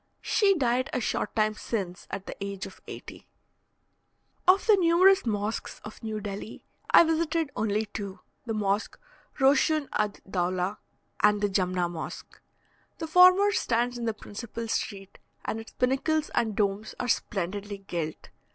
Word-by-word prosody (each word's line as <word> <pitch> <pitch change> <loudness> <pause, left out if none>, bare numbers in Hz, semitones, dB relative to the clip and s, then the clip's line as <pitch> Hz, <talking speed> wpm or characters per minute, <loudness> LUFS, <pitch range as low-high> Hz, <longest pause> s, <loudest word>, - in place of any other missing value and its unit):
She 395 -2 +3
died 255 -3 +1
a - - +1
short 215 -2 -2
time 215 -1 +2
since 195 -5 -4
at 195 0 -5
the - - -7
age 200 -1 -4
of - - -12
eighty. - - -10 1.2
Of 375 +2 +5
the 435 - +7
numerous 370 -1 +5
mosques 210 0 -2
of 215 - -10
New 220 -1 -3
Delhi, 205 +1 -7 0.2
I - - +8
visited 325 -2 0
only 215 0 0
two, 200 -2 -7 0.3
the 225 - -1
Mosque 205 0 -1 0.4
Roshun 285 +2 +3
ad 210 -1 -1
dawla, 185 +1 -1 0.4
and 210 0 +4
the 205 0 +1
Jumna 185 -2 +1
Mosque. 170 -2 -8 0.6
The 325 - -4
former 365 +5 +6
stands 245 - 0
in 240 -1 -4
the 225 -2 -1
principal 230 +2 -7
street, 195 -3 -4 0.3
and 220 - -2
its 225 - -11
pinnacles 285 +5 0
and 220 -3 0
domes 205 +1 -1
are 245 - -2
splendidly 200 -1 -2
gilt. 170 -5 -5
215 Hz, 150 wpm, -28 LUFS, 200-275 Hz, 1.2 s, I